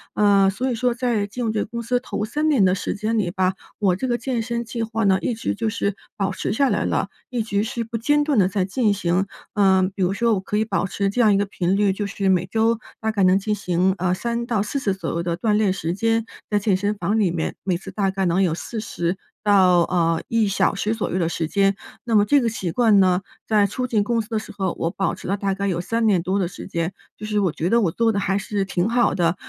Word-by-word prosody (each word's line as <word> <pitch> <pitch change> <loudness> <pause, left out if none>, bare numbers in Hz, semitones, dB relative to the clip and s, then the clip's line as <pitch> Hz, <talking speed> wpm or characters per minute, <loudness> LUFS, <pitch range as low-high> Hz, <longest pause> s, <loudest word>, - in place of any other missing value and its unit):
呃， 200 -2 +4
所 250 +7 -2
以 245 - -1
说 245 +2 +1
在 235 -4 0
进 205 +5 -7
入 230 - 0
这 215 -1 -1
个 - - -2
公 235 +2 -5
司 245 +2 0
头 210 -4 -3
3 300 +7 0
年 255 -10 +4
的 185 0 +3
时 - - -3
间 220 +3 -1
里 185 -5 0
吧， 185 0 +1 0.3
我 190 -4 +2
这 255 +7 -3
个 240 - +1
健 240 -1 -2
身 235 +1 -3
计 230 0 -3
划 225 -1 -1
呢， 190 -1 +4
一 245 - -1
直 230 - -3
就 220 +1 -1
是 205 -3 -2 0.2
保 195 -3 0
持 - - -3
下 275 +4 +2
来 - - 0
了， - - 0 0.2
一 240 -3 -1
直 205 -2 0
是 235 +1 -3
不 230 +1 -8
间 295 +6 +2
断 290 -3 0
地 185 - +4
在 190 -1 0
进 215 +2 +1
行。 185 -1 0 0.3
呃， 190 -2 +4
比 195 - -4
如 185 +1 +2
说 230 +2 +2
我 200 - +1
可 200 +2 -3
以 215 - +1
保 210 - -1
持 200 +1 -1
这 245 - +1
样 220 -3 +5
一 - - +3
个 205 - +1
频 185 -1 -1
率， 205 -2 +3
就 205 +1 -3
是 200 0 -2
每 185 -1 +2
周 225 +3 +1 0.2
大 220 0 -1
概 205 -3 +1
能 185 +1 +5
进 210 +2 -1
行 185 -2 +1
呃， 185 -1 +1
3 235 +4 -2
到 225 -5 +1
4 245 +7 -3
次 200 -7 0
左 190 - -5
右 170 - -2
的 170 -1 -2
锻 210 +4 +1
炼 210 -2 +3
时 170 -3 -2
间， 225 +3 0 0.2
在 210 - +2
健 205 -1 +2
身 205 +2 -1
房 210 +2 0
里 200 -4 +3
面 165 -2 -3
每 185 -3 0
次 180 - -10
大 200 -2 0
概 190 0 -1
能 175 +2 +2
有 180 -4 +2
40 180 -4 -3 0.3
到 190 -4 +5
呃， 165 -1 +1
1 225 -2 +2
小 195 +1 +1
时 210 +2 -1
左 225 - -3
右 180 - -1
的 170 - +1
时 165 -1 -2
间。 195 +3 +2 0.3
那 230 -2 0
么 205 -1 +5
这 285 +7 +4
个 235 - +1
习 190 -6 -3
惯 220 -1 +4
呢， 185 -1 +3 0.3
在 210 -2 +4
初 250 +5 -2
进 220 -4 +1
公 230 +2 0
司 215 - -11
的 225 - -1
时 - - -10
候， 190 -3 -2
我 165 - -1
保 195 - -1
持 - - -10
了 195 - +1
大 200 -1 -1
概 200 +1 -2
有 175 -3 -1
3 230 +5 -1
年 195 -5 +3
多 185 +3 -1
的 190 -3 0
时 180 - -9
间， 170 -1 -2 0.2
就 215 - -7
是 210 -1 0
我 190 -4 +1
觉 160 - -2
得 235 +2 +4
我 180 -6 +1
做 230 +5 +2
的 205 - -1
还 195 0 0
是 200 0 -2
挺 185 -1 0
好 235 +1 +2
的， 170 -1 +1
205 Hz, 285 characters per minute, -22 LUFS, 190-225 Hz, 0.3 s, 样